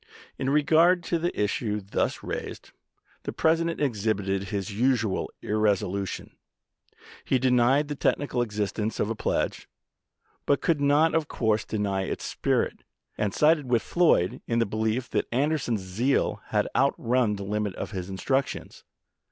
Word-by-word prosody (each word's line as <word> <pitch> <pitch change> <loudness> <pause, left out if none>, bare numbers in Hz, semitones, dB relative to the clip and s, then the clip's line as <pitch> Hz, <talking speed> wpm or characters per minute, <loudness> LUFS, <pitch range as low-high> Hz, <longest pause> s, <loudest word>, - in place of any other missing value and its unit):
In 135 - 0
regard 160 +5 +4
to 170 0 -1
the 175 +2 -2
issue 105 +1 0
thus 100 0 -2
raised, - - -6 0.5
the - - -4
President 165 +1 +1
exhibited 100 -7 0
his 100 +1 -3
usual 115 -3 +1
irresolution. 100 -2 -1 0.9
He 130 - +2
denied 130 +3 +3
the 145 - -3
technical 140 -3 0
existence 105 -1 -2
of 105 - 0
a - - -2
pledge, - - -2 0.8
but 140 - +3
could 160 -4 +1
not 145 +3 +4
of 160 -2 +1
course 110 -2 0
deny 100 -3 -1
its - - -4
spirit, - - -1 0.3
and 105 -2 -1
sided 150 - +3
with 120 -2 +2
Floyd 170 - +2
in 115 - 0
the 115 - +3
belief 110 +4 -1
that - - 0
Anderson's 130 -4 0
zeal 110 +9 0
had - - +1
outrun 120 -3 +2
the 100 - -6
limit 105 -1 -2
of - - -5
his 95 -2 -5
instructions. 130 +8 -2
115 Hz, 145 wpm, -26 LUFS, 105-145 Hz, 0.9 s, regard